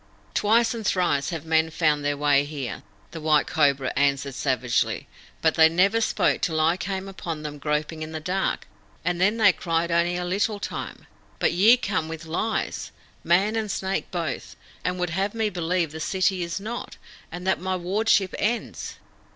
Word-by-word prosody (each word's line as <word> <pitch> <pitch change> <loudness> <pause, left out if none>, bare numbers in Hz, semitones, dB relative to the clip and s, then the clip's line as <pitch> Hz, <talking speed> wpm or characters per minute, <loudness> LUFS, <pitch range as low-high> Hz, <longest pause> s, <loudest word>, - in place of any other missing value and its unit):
"Twice 225 +2 +3
and 230 -1 -5
thrice 175 -8 +1
have 165 -2 -5
men 160 0 +2
found 155 -2 +1
their 145 0 0
way 145 -1 +3
here," 145 -4 -5 0.3
the 165 - -7
White 155 -1 +3
Cobra 140 -3 +1
answered 140 0 +1
savagely; 130 -2 0 0.4
"but - - +4
they 160 0 +6
never 195 +7 +3
spoke 220 - +1
till 160 -3 0
I 160 +2 +3
came 190 +1 -4
upon 165 -5 -6
them 150 -1 -6
groping 150 +2 -2
in 155 0 -5
the 160 - -4
dark, 185 +4 -1 0.4
and 180 0 0
then 205 +4 +3
they 200 -4 +6
cried 170 0 -1
only 170 +1 +2
a 180 - -2
little 205 +3 0
time. - - -6 0.3
But - - +2
ye 215 +8 +6
come 195 -9 -1
with 160 0 -7
lies, 215 +7 -2 0.3
Man 195 +6 +3
and 220 -2 -1
Snake 190 0 -2
both, 165 -6 -4 0.3
and 180 0 -1
would 180 -2 -2
have 195 +5 -1
me 220 -2 0
believe 175 -2 -1
the 160 - -7
city 185 +2 +1
is 170 +2 -3
not, 225 +4 -6 0.3
and 180 +1 -7
that 190 - +1
my 185 0 -1
wardship 195 +2 +1
ends. 230 +3 -2
175 Hz, 180 wpm, -25 LUFS, 155-195 Hz, 0.4 s, they